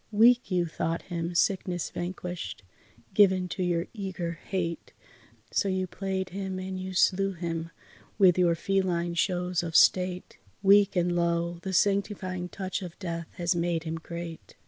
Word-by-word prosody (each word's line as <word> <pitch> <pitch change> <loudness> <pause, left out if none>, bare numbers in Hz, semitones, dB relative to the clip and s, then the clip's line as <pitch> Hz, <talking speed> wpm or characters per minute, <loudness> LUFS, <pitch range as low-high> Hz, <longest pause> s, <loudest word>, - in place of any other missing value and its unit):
Weak 235 +4 +5
you 180 -2 +1
thought 165 0 -2
him, 170 -1 -4
sickness 180 -1 0
vanquished, 175 - -5 0.5
given 190 -3 +4
to 185 - -4
your 175 -1 +1
eager 190 -5 -4 0.2
hate. 170 -3 -3 0.6
So 200 - +1
you 185 0 0
played 190 0 -3
him 190 0 -4
and 185 0 -4
you 185 0 -5
slew 195 +1 +3
him 165 -2 -4 0.5
with 185 -4 +6
your 175 -2 +3
feline 175 -2 0
shows 180 0 0
of 165 -1 -5
state, 180 -1 +3 0.2
Weak 200 0 +6
and 175 -1 +1
lo! 170 0 0
the 190 - -4
sanctifying 190 -2 0
touch 190 0 -4
of 175 -3 -8
death 170 -3 -4
has 175 0 0
made 170 -1 0
him 165 0 -3
great. 170 0 -8
180 Hz, 150 wpm, -28 LUFS, 170-190 Hz, 0.6 s, with